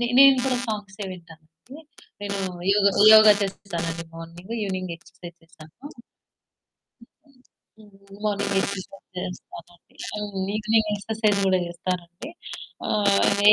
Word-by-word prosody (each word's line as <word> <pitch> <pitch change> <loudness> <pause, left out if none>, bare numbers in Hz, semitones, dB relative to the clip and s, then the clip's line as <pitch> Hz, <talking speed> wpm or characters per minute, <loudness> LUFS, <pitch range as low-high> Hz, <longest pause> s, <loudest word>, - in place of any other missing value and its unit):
నే 240 - +1
నేను 275 -1 +9
కూడా 255 -1 +1
సాంగ్సే 205 -1 -5
వింటానండి. 160 -3 -14 0.7
నేను 200 -1 -3 0.3
యోగ, 205 -1 +2 0.3
యోగ 215 0 +9 0.2
చేస్తానండి 170 -4 -4
మార్నింగు. 170 +5 -10
ఈవెనింగ్ 185 -3 -3
ఎక్సర్‌సైజ్ 170 0 -13
చేస్తాను. 165 -1 -17 2.1
హ్మ్. 210 -1 -17 0.3
మార్నింగ్ 200 -1 0
ఎక్సర్‌సైజ్ 195 0 -6
చేస్తానండి. 175 -1 -10 0.2
అవును. 205 -2 -4 0.2
ఈవెనింగ్ 215 0 +2
ఎక్సర్‌సైజ్ 215 0 0
కూడా 185 -1 +3
చేస్తానండి. 175 - -5 0.6
ఆహ్, 200 -1 +3
195 Hz, 100 wpm, -24 LUFS, 175-210 Hz, 2.1 s, నేను